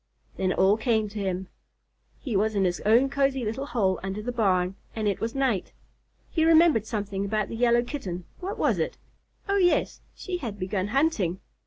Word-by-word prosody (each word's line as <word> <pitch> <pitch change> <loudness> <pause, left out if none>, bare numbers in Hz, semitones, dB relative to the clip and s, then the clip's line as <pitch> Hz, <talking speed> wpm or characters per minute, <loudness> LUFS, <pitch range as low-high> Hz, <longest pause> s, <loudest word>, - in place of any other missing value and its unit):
Then 185 -1 0
it - - -8
all 195 +3 +4
came 220 -2 +1
to 210 +1 -6
him. 190 -1 -2 0.7
He 225 - -4
was 215 +2 +1
in 195 -1 +2
his 175 -1 0
own 235 +5 +5
cozy 270 -2 0
little 255 +6 -3
hole 200 -7 +1
under 195 +2 -4
the 245 - -2
barn, 190 -6 +1 0.2
and 220 -2 -1
it 200 - 0
was 225 +2 -3
night. 260 -9 0 0.6
He 320 - +1
remembered 320 -9 +5
something 200 -3 -3
about 210 +1 -1
the - - -5
Yellow 240 0 +3
Kitten. 185 - -5
What 380 +3 -4
was - - +1
it? - - -2 0.5
Oh 400 0 +2
yes, 355 -3 +2
she 365 -2 -4
had 230 -10 -5
begun 185 0 -2
hunting. 215 - +1
220 Hz, 190 wpm, -26 LUFS, 195-265 Hz, 0.7 s, own